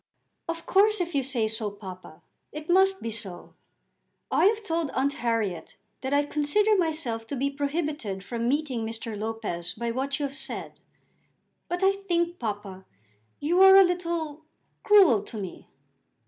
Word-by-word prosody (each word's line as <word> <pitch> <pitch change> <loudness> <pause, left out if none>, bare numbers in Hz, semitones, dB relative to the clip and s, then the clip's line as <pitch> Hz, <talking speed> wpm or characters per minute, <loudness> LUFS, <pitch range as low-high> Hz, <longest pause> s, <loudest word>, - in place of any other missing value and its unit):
"Of 330 0 -4
course, 425 +2 +4
if 350 -1 -2
you 280 - +2
say 255 -4 0
so, 220 -1 -2
papa, 185 -5 -11 0.3
it 305 +3 -5
must 385 +1 +3
be 230 - -3
so. 200 -5 -5 0.8
I - - +3
have 430 +2 +3
told 330 -5 -1
Aunt 275 +2 +1
Harriet 225 - -2 0.3
that 265 - -3
I 285 +1 +3
consider 355 +10 +2
myself 305 - -1
to 280 - -4
be 275 +2 -1
prohibited 285 - -3
from 235 +2 -2
meeting 275 -5 -1
Mr. 225 0 -5
Lopez 210 -5 -4
by 235 +1 -2
what 270 +3 -2
you 290 - 0
have 275 0 -6
said; - - -4 0.9
but 355 +2 -2
I 385 - +6
think, 350 -3 -1
papa, 205 -4 -5 0.6
you 345 +5 +2
are 385 0 +9
a 390 - +9
little 340 -4 -2 0.4
cruel 380 - +6
to 215 +2 -9
me." 190 -4 -7
280 Hz, 160 wpm, -26 LUFS, 225-345 Hz, 0.9 s, are